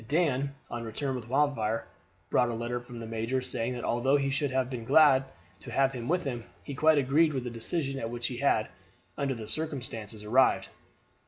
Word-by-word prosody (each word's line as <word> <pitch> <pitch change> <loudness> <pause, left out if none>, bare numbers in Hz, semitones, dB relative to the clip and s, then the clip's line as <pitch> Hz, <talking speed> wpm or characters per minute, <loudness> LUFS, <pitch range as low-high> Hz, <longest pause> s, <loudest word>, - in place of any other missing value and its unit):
Dan, 140 -3 +1 0.2
on 120 - -3
his 115 - -6
return 130 +4 -2
with 120 -3 -6
Wildfire, 125 -5 +1 0.5
brought 125 - +3
a 115 - -2
letter 120 +1 -2
from 120 0 -11
the 115 - -6
major 115 +3 -1
saying 125 -1 -2
that 120 - -5
although 130 +4 +2
he 140 -1 0
should 140 +1 0
have 130 -1 +1
been 125 -3 -5
glad 135 +1 +6 0.3
to - - -10
have 135 -1 +3
had 130 - -6
him 120 - -5
with 180 +2 +1
him, 120 -4 -4 0.2
he 140 - -6
quite 155 +3 +4
agreed 145 +4 +3
with 130 -2 -2
the 125 - -4
decision 135 +4 -2
at 115 - -3
which 120 0 -4
he 125 0 -2
had, 120 -5 +2 0.5
under 135 -2 -1
the 110 -2 -7
circumstances, 120 -9 -4
arrived. 125 +5 +3
130 Hz, 215 wpm, -29 LUFS, 115-140 Hz, 0.5 s, glad